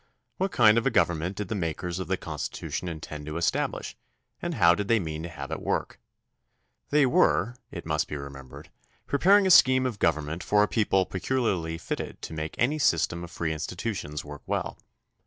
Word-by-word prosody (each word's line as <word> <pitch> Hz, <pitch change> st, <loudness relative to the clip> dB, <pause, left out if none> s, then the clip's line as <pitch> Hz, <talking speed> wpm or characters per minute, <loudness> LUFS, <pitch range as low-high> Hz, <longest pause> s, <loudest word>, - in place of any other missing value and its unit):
What 190 Hz, 0 st, 0 dB
kind 110 Hz, -1 st, +6 dB
of 115 Hz, -, -1 dB
a -, -, +5 dB
government 85 Hz, -3 st, +1 dB
did 105 Hz, -1 st, -4 dB
the 110 Hz, -, -3 dB
makers 90 Hz, -1 st, -3 dB
of 95 Hz, -, -4 dB
the 95 Hz, 0 st, 0 dB
Constitution 80 Hz, +3 st, -5 dB
intend 75 Hz, -2 st, -7 dB
to 75 Hz, +1 st, -4 dB
establish 85 Hz, -, -1 dB, 0.5 s
and 175 Hz, -1 st, -3 dB
how 85 Hz, -7 st, +6 dB
did 100 Hz, +2 st, -2 dB
they 115 Hz, -1 st, +4 dB
mean 80 Hz, -4 st, -4 dB
to 85 Hz, -, -6 dB
have 75 Hz, -2 st, -8 dB
it 80 Hz, -, -3 dB
work? -, -, -2 dB, 0.9 s
They 145 Hz, -1 st, +4 dB
were, 100 Hz, -, +3 dB
it -, -, -8 dB
must -, -, 0 dB
be 75 Hz, -, -4 dB
remembered, 70 Hz, -2 st, -10 dB, 0.3 s
preparing 195 Hz, +8 st, +4 dB
a 190 Hz, -, +4 dB
scheme 130 Hz, -4 st, +7 dB
of 120 Hz, -5 st, -3 dB
government 80 Hz, +1 st, 0 dB
for 105 Hz, 0 st, +3 dB
a -, -, +2 dB
people 100 Hz, -4 st, +2 dB
peculiarly 95 Hz, -6 st, -1 dB
fitted -, -, -5 dB
to -, -, -6 dB
make 80 Hz, 0 st, -4 dB
any 145 Hz, +6 st, +1 dB
system 85 Hz, -, +1 dB
of 85 Hz, -, -8 dB
free 80 Hz, -1 st, -2 dB
institutions 80 Hz, -2 st, -4 dB
work 75 Hz, -1 st, -9 dB
well. -, -, -2 dB
90 Hz, 190 wpm, -27 LUFS, 80-115 Hz, 0.9 s, scheme